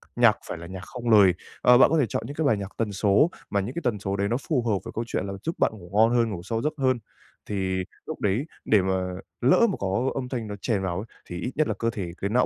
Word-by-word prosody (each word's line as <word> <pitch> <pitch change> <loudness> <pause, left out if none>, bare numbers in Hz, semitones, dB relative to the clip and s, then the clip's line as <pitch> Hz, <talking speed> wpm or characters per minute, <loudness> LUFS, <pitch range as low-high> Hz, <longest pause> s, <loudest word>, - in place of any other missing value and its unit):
nhạc - - +5
phải - - -4
là 85 +1 -9
nhạc 95 0 -7
không 120 +1 -5
lời. 100 -5 +7 0.3
Ờ, 125 0 +7
bạn 135 - +7
có 165 - +2
thể 135 - +4
chọn 110 - -2
những 140 +4 -7
cái 160 - 0
bài 110 - +3
nhạc 100 0 -6
tần 110 -2 -1
số, 100 - +3 0.2
mà 100 - +1
những 110 +7 -4
cái 170 - -2
tần 110 -5 +1
số 95 0 -2
đấy 100 0 0
nó 120 +4 0
phù 140 -7 +2
hợp 105 - +2
với - - -6
câu 115 - -1
chuyện 95 - -2
là 100 - -4
giúp 165 - -2
bạn - - +3
ngủ 90 -5 -12
ngon 110 +2 +5
hơn, 115 -2 +3
ngủ 90 -5 -5
sâu 115 -1 -2
giấc 150 +3 0
hơn. 130 -3 +2 0.5
Thì 95 -2 -1 0.2
lúc - - -6
đấy 105 +8 0 0.2
để 105 -3 +4
mà 95 0 0 0.5
lỡ 140 - +5
mà - - -2
có 100 +7 0
âm 130 -2 -3
thanh 115 -5 -3
nó 105 - -5
chèn 110 -6 0
vào 90 -2 -2
ấy, 105 - -4 0.2
thì 90 - -5
ít 125 - -3
nhất 155 +1 +2
là - - 0
cơ 115 - +1
thể, 95 -6 -4
cái 100 - 0
não 125 +3 +3
110 Hz, 295 wpm, -26 LUFS, 95-125 Hz, 0.5 s, lời